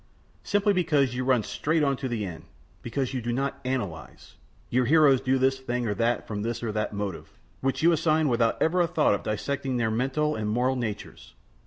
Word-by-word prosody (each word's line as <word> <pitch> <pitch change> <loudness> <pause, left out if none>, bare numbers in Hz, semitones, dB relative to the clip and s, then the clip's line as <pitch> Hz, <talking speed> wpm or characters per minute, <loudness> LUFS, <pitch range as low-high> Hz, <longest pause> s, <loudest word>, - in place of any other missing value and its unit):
Simply 205 0 +2
because 150 -8 +2
you 125 +1 -2
run 125 -3 +2
straight 155 +7 0
on 140 -1 +2
to 135 - -3
the 115 -4 -2
end; 80 -4 -8 0.4
because 130 +2 -3
you 130 - -2
do 120 +1 -2
not 135 +3 -2
analyze. 110 -11 -5 0.4
Your 125 +1 +2
heroes 140 -2 +5
do 135 0 +1
this 130 0 +2
thing 125 -2 -2
or 105 - 0
that 115 +4 0
from 105 -1 -4
this 115 +2 -3
or 115 - -1
that 105 0 -2
motive, 100 -3 -6 0.2
which 135 +3 -1
you 170 - +6
assign 155 -1 +2
without 115 -3 +1
ever 175 +3 +2
a 170 - +2
thought 160 -8 +2
of 100 - -1
dissecting 130 +4 -2
their 115 -2 0
mental 135 +6 0
and 105 -1 -2
moral 125 +4 +1
natures. 115 -5 -6
130 Hz, 205 wpm, -26 LUFS, 115-140 Hz, 0.4 s, you